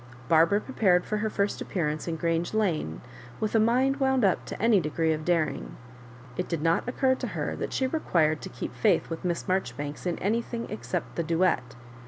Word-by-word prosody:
Barbara 165 +5 +5
prepared 195 -7 +2
for 215 - -1
her 215 +1 -1
first 200 -1 -1
appearance 155 -4 -2
in 165 - -1
Grange 165 +4 -1
Lane, 165 - 0 0.4
with 215 - -1
a 225 - +5
mind 255 +5 +3
wound 265 -4 +2
up 190 - +1
to - - -6
any 225 -2 +4
degree 160 0 0
of 155 0 -4
daring. 165 -2 -1 0.6
It 180 - -2
did 165 -3 -2
not 165 +8 +2
occur 260 +1 +2
to - - -4
her - - -3
that^she 265 - -1
required 160 - +2
to 190 - -6
keep - - -6
faith 195 -6 +2
with 165 - -5
Miss 175 -2 -1
Maijoribanks 150 -5 -2
in 175 - -1
anything 230 +3 -1
except 185 -4 -4
the 170 - +1
duet. 165 -7 +1
180 Hz, 190 wpm, -27 LUFS, 165-220 Hz, 0.6 s, Barbara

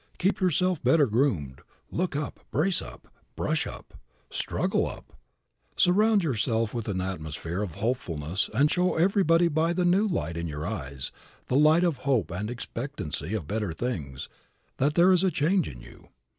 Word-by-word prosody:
Keep 190 +3 +1
yourself 180 -2 +1
better 160 -3 +5
groomed; 105 - 0 0.3
look 180 -3 -1
up, 145 0 -3
brace 180 +4 +1
up, - - -11 0.3
brush - - -1
up, - - -10 0.4
struggle - - 0
up. - - -10 0.6
Surround 205 +3 +4
yourself 115 -5 0
with 115 -2 -4
an 95 -3 -1
atmosphere 85 -1 -4
of 90 -7 -4
hopefulness 90 - -2
and 140 +7 +3
show 180 0 +2
everybody 170 -1 +4
by 165 +1 +1
the 180 0 +1
new 190 +5 +3
light 85 - -2
in 85 0 -3
your 75 0 -5
eyes, 70 -10 -4 0.4
the 125 - +1
light 155 +4 +5
of 170 -6 +1
hope 125 - 0
and 100 +5 -3
expectancy 115 - -4
of 95 -8 -3
better 105 +1 -2
things, 80 - -4 0.5
that 145 +3 +1
there 175 +2 +6
is 185 0 +4
a 190 - +4
change 175 +3 +1
in 60 -3 -10
you. - - -15
130 Hz, 165 wpm, -27 LUFS, -, 0.6 s, there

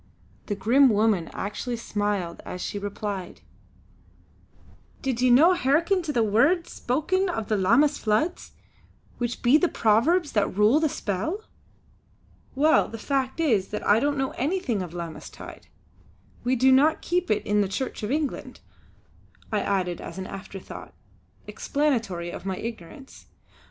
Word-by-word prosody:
The 205 - -1
grim 250 +7 +4
woman 210 -6 +2
actually 225 +4 -4
smiled 205 -6 -3
as 180 - -7
she 205 - -4
replied: 200 -2 -5 1.6
"Did 260 -3 -1
ye 255 - +4
no 305 +9 +6
hearken 335 +5 +2
to 320 -3 -3
the 235 -5 +2
words 280 - +2
spoken 365 +9 0
of 225 - -4
the 215 - +2
Lammas 235 +10 +3
floods, 225 +12 -1 0.7
which 240 -1 -3
be 245 +5 +6
of - - -4
the 355 - +3
Powers 280 +10 +2
that 200 -3 0
rule 215 +8 +5
the 315 -1 +1
Spell?" 225 - -3 1.1
"Well, 305 +4 +4
the 225 - -8
fact 265 +4 -2
is 225 -12 +2
that 210 - -5
I 210 +2 +5
don't 285 +3 0
know 270 0 -1
anything 275 - -1
of 175 -1 -7
'Lammas 170 -2 -7
tide!' - - -12 0.8
We 250 +2 +1
do 260 +2 +4
not 295 +5 +4
keep 360 +1 -1
it 210 - 0
in 210 0 +2
the 200 - +1
Church 250 +7 -4
of 210 - -3
England," 295 +1 -3 0.9
I 215 - +1
added 185 -4 -1
as - - -8
an 190 - -5
afterthought, 195 0 -9 0.5
explanatory 225 - -1
of - - -8
my 190 -1 -3
ignorance. 230 - -9
235 Hz, 150 wpm, -25 LUFS, 205-290 Hz, 1.6 s, no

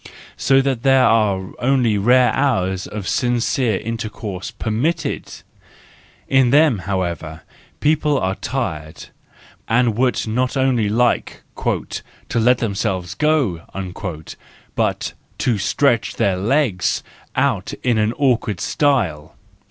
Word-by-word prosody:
And - - -14 0.2
So 135 0 +3
there 135 0 +3
are 100 -5 +2
only 125 -4 +2
rare 125 +4 +4
hours 95 -9 0
of 105 -3 -6
sincere 120 -2 +1
intercours 105 -4 -5
z - - -8
permitted: 120 +10 -1 1.0
in 135 -2 +4
them, 145 -4 +4
however, 85 -4 -3 0.4
people 150 -1 +2
are 95 0 0
tired, 95 - -4 0.6
and 115 -1 +2
would 125 +1 +1
not 125 +4 -1
only 125 -5 +2
like 120 +3 0
" - - -39 0.8
to - - +2
let 125 +2 +4
themselves 95 -5 -2
go," 135 - +1 1.1
but - - -1 0.2
to 115 -5 0
stretch 120 +3 +1
their 95 -2 +1
legs 105 - +1 0.3
out - - 0
wide 120 -3 +3
in 105 +1 +2
awkward 120 -8 0
style. 95 - 0
115 Hz, 115 wpm, -20 LUFS, 95-130 Hz, 1.1 s, rare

